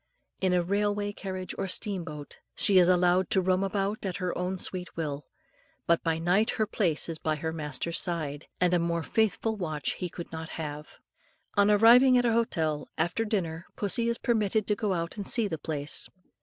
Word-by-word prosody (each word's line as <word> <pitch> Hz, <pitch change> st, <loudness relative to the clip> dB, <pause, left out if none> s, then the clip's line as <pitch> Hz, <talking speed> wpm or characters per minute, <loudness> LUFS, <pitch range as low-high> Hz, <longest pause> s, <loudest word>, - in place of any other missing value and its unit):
In 190 Hz, -1 st, +1 dB
a 180 Hz, -1 st, +2 dB
railway 205 Hz, +2 st, 0 dB
carriage 185 Hz, -2 st, -5 dB
or -, -, -1 dB
steam 190 Hz, 0 st, -2 dB
boat, 150 Hz, -3 st, -9 dB, 0.2 s
she 195 Hz, -3 st, +4 dB
is 180 Hz, 0 st, +5 dB
allowed 180 Hz, +1 st, +3 dB
to 190 Hz, -, +3 dB
roam 185 Hz, +1 st, +1 dB
about 195 Hz, +2 st, -1 dB
at 190 Hz, -3 st, -3 dB
her 180 Hz, -2 st, -2 dB
own 180 Hz, +1 st, -2 dB
sweet 180 Hz, -1 st, -5 dB
will; 145 Hz, -3 st, -3 dB, 0.6 s
but 170 Hz, 0 st, +3 dB
by 165 Hz, -1 st, 0 dB
night 180 Hz, +6 st, +2 dB
her 215 Hz, -, +2 dB
place 180 Hz, -7 st, 0 dB
is 165 Hz, -2 st, -3 dB
by 155 Hz, -1 st, 0 dB
her 160 Hz, +2 st, -3 dB
master's 155 Hz, +1 st, -1 dB
side, 155 Hz, -4 st, -3 dB
and 180 Hz, -1 st, +3 dB
a 175 Hz, -, +4 dB
more 170 Hz, 0 st, -1 dB
faithful 220 Hz, +2 st, 0 dB
watch 155 Hz, -6 st, -2 dB
he 180 Hz, -, -4 dB
could 170 Hz, 0 st, -8 dB
not 160 Hz, 0 st, -6 dB
have. 150 Hz, -1 st, -6 dB, 0.6 s
On 205 Hz, 0 st, +4 dB
arriving 240 Hz, +5 st, +7 dB
at 245 Hz, -, +2 dB
an 230 Hz, -, +3 dB
hotel, 160 Hz, -10 st, 0 dB
after 175 Hz, +8 st, 0 dB
dinner 180 Hz, -6 st, -2 dB
pussy 230 Hz, +3 st, +1 dB
is 235 Hz, -, 0 dB
permitted 215 Hz, -2 st, +1 dB
to 210 Hz, -, +1 dB
go 205 Hz, -1 st, -1 dB
out 170 Hz, -1 st, -2 dB
to 205 Hz, -, -4 dB
see 225 Hz, +2 st, +2 dB
the 160 Hz, -5 st, -4 dB
place. 150 Hz, -1 st, -1 dB
180 Hz, 195 wpm, -28 LUFS, 165-205 Hz, 0.6 s, arriving